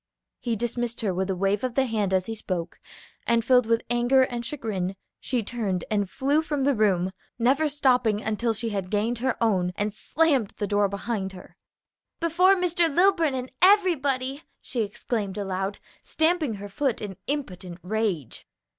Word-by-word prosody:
He 235 Hz, -2 st, -1 dB
dismissed 240 Hz, +1 st, -2 dB
her 200 Hz, -4 st, 0 dB
with 190 Hz, +2 st, -2 dB
a 190 Hz, -, 0 dB
wave 195 Hz, +3 st, 0 dB
of 255 Hz, -2 st, -2 dB
the 270 Hz, -, +3 dB
hand 215 Hz, -5 st, -1 dB
as 185 Hz, -1 st, +2 dB
he 225 Hz, -, -4 dB
spoke, 185 Hz, -5 st, -4 dB, 0.5 s
and, 235 Hz, -1 st, +2 dB
filled 250 Hz, -3 st, +4 dB
with 230 Hz, 0 st, +2 dB
anger 240 Hz, +2 st, +4 dB
and 240 Hz, -2 st, -3 dB
chagrin, 210 Hz, -8 st, -3 dB, 0.2 s
she 245 Hz, -3 st, -1 dB
turned 205 Hz, -6 st, -2 dB
and 205 Hz, -3 st, +1 dB
flew 285 Hz, +6 st, +1 dB
from 295 Hz, -3 st, -2 dB
the 280 Hz, +1 st, +3 dB
room, 190 Hz, -5 st, +2 dB, 0.3 s
never 270 Hz, +6 st, +2 dB
stopping 250 Hz, -7 st, +2 dB, 0.2 s
till 235 Hz, +1 st, +1 dB
she 230 Hz, +2 st, -2 dB
had 195 Hz, -3 st, -3 dB
gained 220 Hz, +4 st, 0 dB
her 255 Hz, 0 st, 0 dB
own 185 Hz, -6 st, +1 dB
and 205 Hz, 0 st, -1 dB
slammed 275 Hz, -2 st, +1 dB
the 205 Hz, -, -1 dB
door 205 Hz, -1 st, +2 dB
behind 200 Hz, -1 st, -3 dB
her. 180 Hz, -, -13 dB, 0.6 s
"Before 360 Hz, +3 st, +4 dB
Mr. 345 Hz, -2 st, +2 dB
Lilburn 335 Hz, -3 st, +3 dB
and 255 Hz, 0 st, -4 dB
everybody!" 290 Hz, -9 st, +3 dB, 0.2 s
she 240 Hz, -, -3 dB
exclaimed 210 Hz, -1 st, -3 dB
aloud, 195 Hz, 0 st, -2 dB, 0.2 s
stamping 315 Hz, -7 st, +1 dB
her 205 Hz, 0 st, -7 dB
foot 260 Hz, +4 st, -1 dB
in 200 Hz, -3 st, -6 dB
impotent 185 Hz, -11 st, -4 dB
rage. 190 Hz, -, -2 dB
230 Hz, 170 wpm, -26 LUFS, 200-270 Hz, 0.6 s, filled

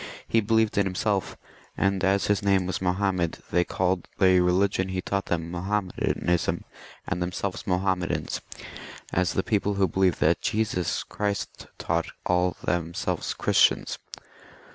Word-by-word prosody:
He 115 Hz, -, +3 dB
believed 110 Hz, -1 st, +2 dB
it 100 Hz, -, +3 dB
himself, 95 Hz, +1 st, -1 dB, 0.4 s
and 95 Hz, -1 st, +1 dB
as 95 Hz, +1 st, +2 dB
his 105 Hz, 0 st, +2 dB
name 100 Hz, -2 st, +2 dB
was 90 Hz, 0 st, -3 dB
Mahomet, 90 Hz, -2 st, 0 dB
they 90 Hz, 0 st, +3 dB
called 90 Hz, 0 st, -1 dB
the 95 Hz, -1 st, +5 dB
religion 95 Hz, +1 st, +2 dB
he 95 Hz, 0 st, -2 dB
taught 100 Hz, +1 st, -2 dB
them 85 Hz, -1 st, -2 dB
Mahometanism 90 Hz, -2 st, -1 dB, 0.4 s
and 90 Hz, -, -2 dB
themselves 90 Hz, +2 st, -3 dB
Mahommedans, 90 Hz, -1 st, 0 dB, 0.7 s
as 90 Hz, -2 st, +1 dB
the 95 Hz, -, 0 dB
people 105 Hz, -1 st, 0 dB
who 100 Hz, -1 st, +3 dB
believe 95 Hz, +1 st, +1 dB
what 85 Hz, +2 st, +3 dB
Jesus 105 Hz, -5 st, 0 dB
Christ 100 Hz, -1 st, -3 dB
taught -, -, -1 dB, 0.2 s
call 90 Hz, 0 st, +1 dB
themselves 85 Hz, -1 st, -2 dB
Christians. -, -, +2 dB
95 Hz, 135 wpm, -26 LUFS, 90-100 Hz, 0.7 s, the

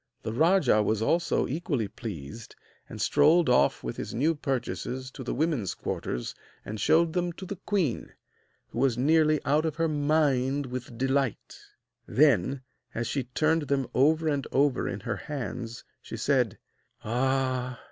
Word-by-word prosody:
The 110 Hz, -, -3 dB
rajah 155 Hz, -, +4 dB
was 110 Hz, +1 st, 0 dB
also 170 Hz, +8 st, +1 dB
equally 140 Hz, -6 st, -2 dB
pleased, 100 Hz, -, -8 dB, 0.3 s
and -, -, -8 dB
strolled 155 Hz, +1 st, +4 dB
off 125 Hz, -, +3 dB
with -, -, -5 dB
his -, -, -5 dB
new 150 Hz, +7 st, +2 dB
purchases 130 Hz, -2 st, -3 dB
to 130 Hz, -, -8 dB
the 120 Hz, -, -3 dB
women's 145 Hz, -, 0 dB
quarters -, -, -4 dB, 0.3 s
and 105 Hz, +1 st, -5 dB
showed 165 Hz, +4 st, +3 dB
them 175 Hz, -1 st, 0 dB
to 190 Hz, -, -9 dB
the 200 Hz, +1 st, -6 dB
queen, 180 Hz, -, 0 dB, 0.6 s
who -, -, -5 dB
was 130 Hz, -3 st, +2 dB
nearly 155 Hz, +3 st, +3 dB
out 150 Hz, +3 st, +2 dB
of 160 Hz, -2 st, -2 dB
her 165 Hz, 0 st, +1 dB
mind 145 Hz, -3 st, +1 dB
with 125 Hz, -2 st, -7 dB
delight. 135 Hz, -1 st, -1 dB, 0.5 s
Then, 135 Hz, -2 st, +3 dB, 0.3 s
as 120 Hz, -, -1 dB
she 130 Hz, +2 st, -2 dB
turned 155 Hz, +4 st, +1 dB
them 135 Hz, -1 st, +1 dB
over 155 Hz, +5 st, +3 dB
and 145 Hz, -3 st, 0 dB
over 140 Hz, -2 st, +2 dB
in -, -, -5 dB
her -, -, -3 dB
hands, 125 Hz, -5 st, -6 dB, 0.2 s
she -, -, -7 dB
said: -, -, +1 dB, 0.5 s
'Ah! 130 Hz, +1 st, 0 dB
135 Hz, 155 wpm, -28 LUFS, 125-155 Hz, 0.6 s, rajah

